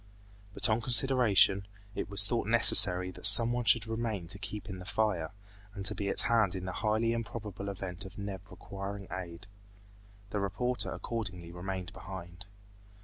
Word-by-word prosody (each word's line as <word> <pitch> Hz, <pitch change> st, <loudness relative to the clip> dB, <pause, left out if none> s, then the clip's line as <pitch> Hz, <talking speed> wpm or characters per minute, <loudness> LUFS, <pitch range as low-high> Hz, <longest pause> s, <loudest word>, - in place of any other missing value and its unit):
But -, -, +2 dB
on 110 Hz, +1 st, 0 dB
consideration, 115 Hz, -6 st, +4 dB, 0.3 s
it -, -, -5 dB
was 100 Hz, 0 st, +5 dB
thought 115 Hz, -1 st, -2 dB
necessary 95 Hz, -5 st, +6 dB
that -, -, +3 dB
someone 120 Hz, +1 st, +4 dB
should 115 Hz, -1 st, +3 dB
remain 110 Hz, -5 st, -4 dB
to 100 Hz, -, -2 dB
keep 105 Hz, -1 st, -7 dB
in 95 Hz, -2 st, -7 dB
the 90 Hz, -, -10 dB
fire, 95 Hz, -7 st, -1 dB, 0.5 s
and 100 Hz, -2 st, -7 dB
to -, -, +4 dB
be 100 Hz, -1 st, -4 dB
at -, -, -1 dB
hand 110 Hz, -5 st, +1 dB
in 90 Hz, -1 st, -6 dB
the 95 Hz, -, -4 dB
highly 110 Hz, +3 st, -1 dB
improbable 105 Hz, -3 st, -6 dB
event 95 Hz, -1 st, -6 dB
of 95 Hz, -1 st, -12 dB
Neb 100 Hz, -2 st, -6 dB
requiring 100 Hz, 0 st, -8 dB
aid. 90 Hz, +1 st, -8 dB, 0.9 s
The 105 Hz, -, -2 dB
reporter 120 Hz, +6 st, -2 dB
accordingly 95 Hz, -7 st, -6 dB
remained 90 Hz, 0 st, -6 dB
behind. 90 Hz, 0 st, -10 dB
100 Hz, 160 wpm, -30 LUFS, 95-115 Hz, 0.9 s, necessary